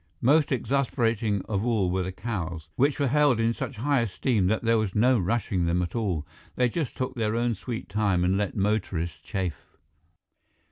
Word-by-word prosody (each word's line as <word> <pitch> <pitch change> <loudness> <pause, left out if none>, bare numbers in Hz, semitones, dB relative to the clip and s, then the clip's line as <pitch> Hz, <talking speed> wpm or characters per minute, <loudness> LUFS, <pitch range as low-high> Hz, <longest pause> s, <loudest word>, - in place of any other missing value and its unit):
Most 145 +4 +4
exasperating 115 -6 0
of 100 -1 -2
all 110 -7 +1
were 95 +1 0
the 95 +1 -3
cows, 90 -7 -5
which 140 +3 +2
were 140 - +2
held 145 -3 +3
in 115 +1 +2
such 130 - -5
high 140 +5 +1
esteem 115 -2 0
that 110 +4 0
there 115 -1 +3
was 105 -3 -2
no 120 +3 +4
rushing 95 -2 0
them 90 +2 +1
at 85 - -5
all. 95 -10 -1 0.3
They 125 -1 +2
just 145 +1 -3
took 130 0 -2
their 110 -3 -1
own 120 0 +1
sweet 115 +2 -6
time 100 -4 +1
and 90 +2 +2
let 100 0 -1
motorists 95 -6 -1
chafe. 95 -4 -5
110 Hz, 185 wpm, -26 LUFS, 95-120 Hz, 0.3 s, Most